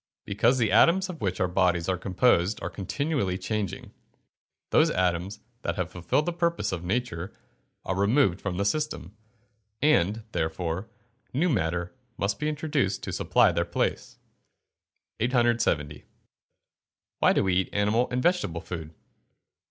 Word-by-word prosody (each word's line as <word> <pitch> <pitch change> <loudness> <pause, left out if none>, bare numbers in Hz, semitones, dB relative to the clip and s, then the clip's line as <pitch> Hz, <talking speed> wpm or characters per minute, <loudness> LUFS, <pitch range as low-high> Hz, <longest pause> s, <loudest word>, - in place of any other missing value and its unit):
_ - - -68
Because 115 +6 +2
the 115 -4 +1
atoms 185 +3 +4
of 170 -4 -7
which 90 -2 -1
our 95 - +2
bodies 90 -2 +1
are 95 - +1
composed 95 +1 +2
are - - -3
continually 120 - -2
changing. 105 -2 -4 0.8
Those - - +5
atoms 90 +2 -1 0.2
that 85 - -2
have 90 -1 -3
fulfilled 90 - 0
the 175 - -1
purposes 170 - 0
of 90 -2 -4
nature 95 -3 -2 0.5
are - - -1
removed 100 -1 +2
from 95 -3 -3
the 100 - 0
system, 150 - -2 0.6
and, 115 - +2
therefore, 85 +4 -2 0.5
new 170 +6 +2
matter 85 - -1 0.2
must 100 0 -1
be 150 - 0
introduced 150 -9 -1
to - - -4
supply - - +3
their - - 0
place. - - -2 1.0
870. 120 - +1 1.2
_Why - - +5
do - - +3
we 95 -1 +1
eat 95 +1 +1
animal 105 +4 +2
and 125 +1 -1
vegetable 175 - +1
food? 80 -3 -7
100 Hz, 145 wpm, -27 LUFS, 90-125 Hz, 1.2 s, Those